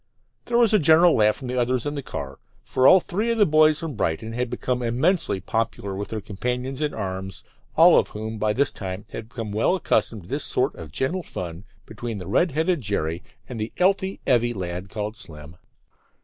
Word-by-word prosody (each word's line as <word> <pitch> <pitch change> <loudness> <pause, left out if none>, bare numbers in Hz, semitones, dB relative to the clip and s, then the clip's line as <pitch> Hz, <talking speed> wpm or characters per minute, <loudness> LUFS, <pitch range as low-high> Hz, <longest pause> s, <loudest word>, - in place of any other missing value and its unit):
There 235 - 0
was 230 -3 +4
a 210 - +6
general 160 +2 +6
laugh 105 -1 +4
from 130 - -8
the 125 0 -1
others 125 0 0
in 145 - -2
the 145 - -4
car, 70 - -7 0.2
for 130 +1 +2
all 190 - +8
three 205 +6 -2
of 230 - +1
the 210 - +5
boys 155 -1 +4
from 160 -2 -5
Brighton 110 +1 -2
had 125 +1 -2
become 125 +1 -2
immensely 125 - +1
popular 100 0 -2
with 100 +1 -4
their 110 - -4
companions 125 +7 -4
in 150 -1 0
arms, 95 0 -5 0.3
all - - +7
of - - -1
whom 110 +1 -6
by 105 0 +1
this 140 +5 +1
time 95 +1 -6
had 110 0 -7
become 115 -4 -6
well 110 - +2
accustomed 115 - 0
to - - -15
this - - -1
sort - - +1
of 80 -3 -10
gentle 135 - -1
fun 90 - -7 0.2
between 110 0 -6
the 90 - -7
red 170 - +2
headed 160 +2 0
Jerry 85 -6 -2 0.3
and 120 -3 -7
"the 110 +1 -3
'ealthy, 190 +1 +1
'eavy 120 -2 +2
lad" 90 0 -5
called 105 0 -4
Slim. 75 -5 -11
120 Hz, 205 wpm, -24 LUFS, 100-150 Hz, 0.3 s, all